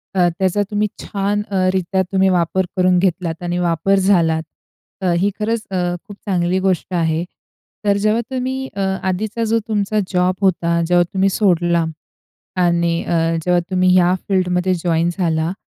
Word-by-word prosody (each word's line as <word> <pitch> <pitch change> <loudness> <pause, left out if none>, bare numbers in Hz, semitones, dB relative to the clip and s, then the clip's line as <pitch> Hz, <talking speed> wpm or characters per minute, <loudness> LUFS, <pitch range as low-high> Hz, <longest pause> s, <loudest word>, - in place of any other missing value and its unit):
अ, 180 -2 +4
त्याचा 190 +1 +1
तुम्ही 210 0 +1 0.2
छान 200 +1 -1
अ, 185 -1 +2
रित्या 190 0 0
तुम्ही 190 0 +3
वापर 185 +1 +1
करून 185 0 +3
घेतलात 175 -2 -1
आणि 175 0 -2
वापर 175 +2 +1
झाला. 170 -5 +3 0.6
अ, 185 -2 +1
ही 195 +4 +2
खरंच 220 +1 -1
अ, 190 - -1 0.3
खूप 205 - -10
चांगली 185 -2 0
गोष्ट 190 -1 -1
आहे. 165 -1 0 0.6
तर 200 -1 +3
जेव्हा 215 +3 +1
तुम्ही 260 +1 -3
अ, 200 - -2 0.3
आधीचा 215 +5 -2
जो 225 +1 +1
तुमचा 215 -1 0
जॉब 180 0 +2
होता, 170 -3 +1
जेव्हा 175 0 +4
तुम्ही 195 0 +2
सोडला 175 -4 +2 0.8
आणि 170 -1 +1
अ, 170 - -1 0.3
जेव्हा 180 -1 +3
तुम्ही 185 0 +3
ह्या 180 0 +4 0.2
फील्डमध्ये 185 -1 +1
जॉइन 170 -1 +1
झाला, 165 -2 0
185 Hz, 155 wpm, -19 LUFS, 175-200 Hz, 0.8 s, अ